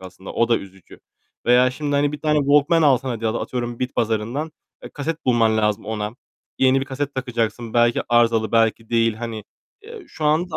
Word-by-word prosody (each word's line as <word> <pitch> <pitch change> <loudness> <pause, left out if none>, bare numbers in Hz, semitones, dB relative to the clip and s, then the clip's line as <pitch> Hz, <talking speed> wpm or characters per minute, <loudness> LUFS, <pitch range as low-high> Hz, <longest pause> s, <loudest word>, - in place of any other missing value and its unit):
aslında, 95 +1 -10
o 115 0 +1
da 115 - +3
üzücü. 95 -1 -14 0.5
Veya 125 +1 +5
şimdi 145 +1 -2
hani 145 +1 +1
1 150 - -6
tane 150 -1 +2
Walkman 145 +3 +3
alsan 135 -2 +3
hadi 115 -2 -3
atıyorum 120 +1 -3
bitpazarından 125 +4 -2 0.3
e, - - -8
kaset 160 +3 -5
bulman 115 -3 +3
lazım 105 -1 0
ona. 105 -1 -3 0.5
Yeni 130 0 +4
bir - - -2
kaset 140 +1 -4
takacaksın. 120 -3 -3
Belki 120 0 +3
arızalı, 115 -2 +2
belki 115 0 +1
değil. 115 -1 +2
Hani, 110 -2 -6 0.4
eee, 440 -3 -11
şu 155 - -7
anda 160 +3 +1
120 Hz, 175 wpm, -21 LUFS, 115-145 Hz, 0.5 s, Veya